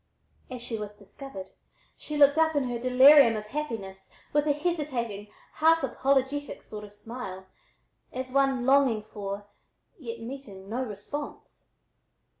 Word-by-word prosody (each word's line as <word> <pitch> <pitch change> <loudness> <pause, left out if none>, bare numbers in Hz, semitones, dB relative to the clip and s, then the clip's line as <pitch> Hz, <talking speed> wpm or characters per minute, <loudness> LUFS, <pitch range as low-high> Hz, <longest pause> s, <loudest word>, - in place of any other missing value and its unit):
As 250 -2 -6
she 230 -2 -3
was 210 0 -7
"discovered" 200 -1 -10 0.4
she 300 - -6
looked 285 +1 +6
up 320 -1 +3
in 285 - +2
her 245 -2 -3
delirium 255 0 +7
of 210 - -5
happiness 210 -8 -5 0.2
with 295 +1 +2
a - - +4
hesitating, 280 - -2 0.3
half 325 +1 +4
apologetic 270 +2 0
sort 210 -1 -8
of 205 - -11
smile, 205 -3 -8 0.7
as 255 0 -5
one 270 -2 +2
longing 265 -5 +4
for, 205 -1 -6 0.5
yet 235 -5 -6
meeting, 225 -6 -8
no 240 +5 -2
response. 250 +6 -7
250 Hz, 135 wpm, -28 LUFS, 210-280 Hz, 0.7 s, delirium